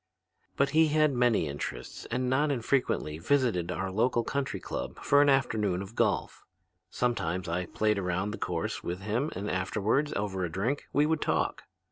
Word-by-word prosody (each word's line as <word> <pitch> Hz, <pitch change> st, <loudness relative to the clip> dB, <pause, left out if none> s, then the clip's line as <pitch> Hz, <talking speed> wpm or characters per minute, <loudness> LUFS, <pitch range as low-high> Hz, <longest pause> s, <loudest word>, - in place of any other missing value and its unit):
"But 140 Hz, 0 st, +2 dB
he 160 Hz, +2 st, +5 dB
had 155 Hz, -1 st, +3 dB
many 120 Hz, -9 st, +2 dB
interests 70 Hz, 0 st, -6 dB
and 125 Hz, 0 st, -1 dB
not 140 Hz, +4 st, +2 dB
infrequently 120 Hz, -, 0 dB
visited 105 Hz, -5 st, +1 dB
our 95 Hz, +1 st, -3 dB
local 120 Hz, +4 st, +2 dB
country 135 Hz, -7 st, -2 dB
club -, -, -5 dB
for 145 Hz, 0 st, +5 dB
an 145 Hz, -, +5 dB
afternoon 105 Hz, -9 st, +1 dB
of 100 Hz, +3 st, -11 dB
golf. -, -, 0 dB, 0.5 s
Sometimes 95 Hz, -7 st, -1 dB
I 85 Hz, +1 st, -2 dB
played 105 Hz, -1 st, +1 dB
around 95 Hz, +2 st, -1 dB
the -, -, -6 dB
course -, -, -2 dB
with 90 Hz, +2 st, -4 dB
him 115 Hz, +9 st, -1 dB
and 100 Hz, +3 st, -4 dB
afterward, 105 Hz, +9 st, 0 dB
over 95 Hz, -2 st, -2 dB
a 90 Hz, -, -1 dB
drink, 115 Hz, -, -1 dB
we 145 Hz, +2 st, +3 dB
would 160 Hz, 0 st, 0 dB
talk. -, -, 0 dB
110 Hz, 170 wpm, -29 LUFS, 95-140 Hz, 0.5 s, he